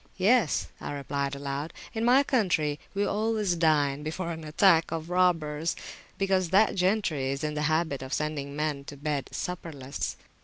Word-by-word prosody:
Yes, 200 -2 +3
I - - -4
replied 140 0 -2
aloud, 140 +3 -4 0.2
in 225 -1 -2
my 255 +4 +6
country 175 - +1 0.2
we 200 +1 +1
always 215 -2 0
dine 150 -4 +2
before 170 +3 -3
an 160 -1 -6
attack 165 +1 +4
of 165 +1 -4
robbers, 165 -3 +1 0.4
because 190 -2 +1
that 200 +4 +4
gentry 180 -8 +1
is 140 +2 -3
in 150 0 -1
the 150 - -2
habit 155 -4 0
of 130 0 -7
sending 145 -2 -2
men 150 -2 -1
to 145 - -9
bed 145 -1 -2
supperless. 150 -6 -4
160 Hz, 160 wpm, -28 LUFS, 145-185 Hz, 0.4 s, my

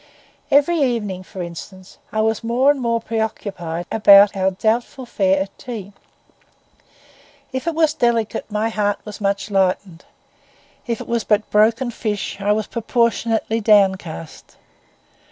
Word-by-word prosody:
Every 290 +4 +3
evening, 215 -8 -1
for 185 0 -7
instance, 185 +2 -10
I 215 - 0
was 220 +1 0
more 245 +5 +3
and 285 -2 -3
more 230 -1 0
preoccupied 200 -7 -4
about 200 -2 +7
our 190 0 +1
doubtful 225 +7 -1
fare 195 -5 +1
at 195 - -14
tea. 210 -5 -7 1.6
If 260 +5 -4
it 335 - -1
was 315 -2 +3
delicate 230 -3 0
my 215 +1 -1
heart 205 -2 0
was 210 0 -9
much 200 +1 -1
lightened; 185 -2 0 0.8
if 235 -2 -2
it - - -9
was 235 -2 -1
but 210 0 0
broken 225 +4 +3
fish 210 -4 -4
I 205 +1 +1
was 215 0 0
proportionally 230 -1 0
downcast. 190 -6 +1
215 Hz, 135 wpm, -20 LUFS, 195-235 Hz, 1.6 s, about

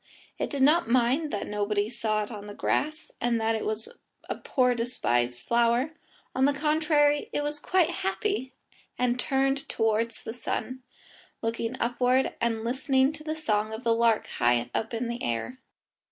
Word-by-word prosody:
It - - -1
did 275 -2 0
not 305 -1 +4
mind 255 +6 +2
that 205 - -2
nobody 205 0 0
saw 220 -2 0
it 210 - -8
in 205 -2 -7
the 205 - -8
grass, 310 +1 -1
and 235 -1 +1
that 225 0 +1
it 220 - -2
was 220 +1 -3 0.4
a - - -1
poor 250 -2 +1
despised 125 - -1
flower; 235 +4 +2 0.4
on 260 - +3
the 285 0 +2
contrary, 300 0 +2
it 290 - -1
was 295 0 -2
quite 350 +1 +2
happy, 385 -7 -1 0.5
and 250 0 +1
turned 270 +1 0
towards 225 +1 0
the 225 - -5
sun, 255 +1 -4 0.6
looking 230 +2 -2
upward 250 +2 +2
and 230 -1 0
listening 265 +3 +2
to 305 0 -11
the 310 0 -3
song 215 -8 0
of 220 +3 -6
the 230 -2 +3
lark 230 -1 +3
high 120 0 +1
up 225 - -1
in 235 +1 -2
the 235 +1 -4
air. 120 - -2
240 Hz, 170 wpm, -27 LUFS, 220-275 Hz, 0.6 s, not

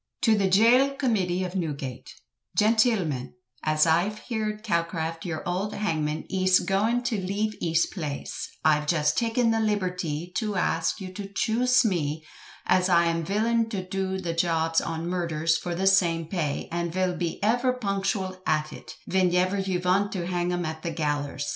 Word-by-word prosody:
"To 225 -2 +5
the 200 -2 +2
Gaol 245 +8 +5
Committee 190 -9 0
of 180 -1 -4
Newgate," 145 -8 -4 0.4
"Gentilmen, 210 - +2 0.3
As 155 0 +2
Ive 175 +6 +2
heerd 215 -2 -4
Calcraft 165 -3 -2
yure 160 -3 -4
ould 185 +4 -2
hangmon 155 -6 -2
iz 185 -1 +3
goin 220 +6 +1
to 225 -3 -1
leeve 205 +3 -1
iz 165 -1 +2
plaise, 150 -7 -5 0.2
Ive 150 -1 +3
just 150 -2 +2
takin 230 0 +1
the 225 - +1
libertee 180 -6 -1
too 215 -3 -2
ask 165 +1 0
yu 185 -1 -7
too 195 +1 -7
chuse 250 +4 +3
me, 155 -6 -1 0.4
as 185 0 +3
I 170 -1 +5
am 165 0 0
villin 225 +5 +1
too 195 -4 -3
do 190 0 -3
the 170 -3 -3
jobs 165 -1 +1
on 165 0 -4
murdrers 165 -2 0
for 175 -1 -4
the 190 +3 -1
same 175 -4 +3
pay, 155 -4 -2
and 170 0 -2
vill 185 +1 0 0.3
ever 245 +4 +2
bee 250 - -7
punkshal 195 -1 -1
hat 155 -1 0
it, - - -10
ven 185 -1 +2
ever 185 +2 +2
yu 190 -2 -1
vant 185 +3 +1
to 180 -3 -3
hang 175 0 -1
em 175 0 -1
up 160 0 -3
at - - -21
the 170 - -3
gallerse. 145 -2 -2
185 Hz, 175 wpm, -26 LUFS, 165-205 Hz, 0.4 s, To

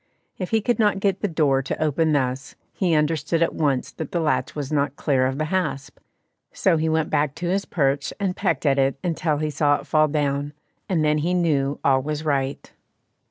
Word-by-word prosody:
If 185 - -3
he 225 -1 +2
could 235 +1 0
not 205 -3 +3
get 195 -1 0
the 205 - +1
door 150 -6 +2
to 135 - -4
open 155 +1 +1
thus, 135 -1 -1 0.2
he 175 -4 +1
understood 155 +2 +1
at - - 0
once 140 -5 0
that 160 - -7
the 175 - 0
latch 160 -2 0
was 145 -2 -4
not 145 -2 0
clear 130 -4 +1
of 130 +1 -3
the 155 - -1
hasp, 180 -7 -2 0.5
so 165 - +2
he 160 +1 0
went 160 -1 0
back 145 -2 +1
to 175 +1 -3
his 195 +2 0
perch 140 -4 0
and 190 -3 -1
pecked 155 -1 -1
at 140 -1 +3
it 135 0 +1
until 160 -3 0
he 155 0 -2
saw 145 0 +2
it - - -6
fall 155 -1 +3
down, 145 -1 -1 0.4
and 165 -5 +1
then 150 0 +2
he 175 +4 0
knew 145 -5 +1
all 135 -1 +4
was 150 +2 -4
right. 140 -2 -1
150 Hz, 210 wpm, -23 LUFS, 140-165 Hz, 0.5 s, all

